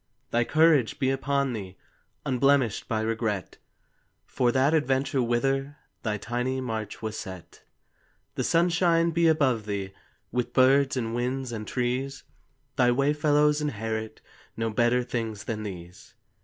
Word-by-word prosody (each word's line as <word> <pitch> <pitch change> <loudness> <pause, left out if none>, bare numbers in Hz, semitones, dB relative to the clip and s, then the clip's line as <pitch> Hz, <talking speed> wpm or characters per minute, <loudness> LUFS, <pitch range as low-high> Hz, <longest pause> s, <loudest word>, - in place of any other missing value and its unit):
Thy 120 +1 +3
courage 155 -3 +3
be 135 -3 +1
upon 135 0 0
thee, 95 -4 -7 0.5
Unblemished 135 -3 +2
by 110 -1 -1
regret, 110 -3 -2 0.7
For 125 -2 +1
that 135 +4 +2
adventure 135 -3 +1
whither 135 +4 0 0.2
Thy 105 -2 -1
tiny 125 +4 -2
march 110 -4 -5
was 110 0 -3
set. 95 -3 -9 0.7
The - - -2
sunshine 170 0 +3
be 170 0 +3
above 130 -9 +2
thee, 100 -2 -3 0.4
With 125 -1 -2
birds 135 +1 +4
and 115 -2 -2
winds 125 +1 -2
and 110 -2 -5
trees. 125 +2 -2 0.5
Thy 125 - +4
way 140 +4 +2
fellows 150 0 +2
inherit 110 -5 -3 0.4
No 115 0 -1
better 120 +3 +2
things 115 -4 -4
than 110 -2 -4
these. 90 -2 -9
125 Hz, 135 wpm, -27 LUFS, 110-140 Hz, 0.7 s, birds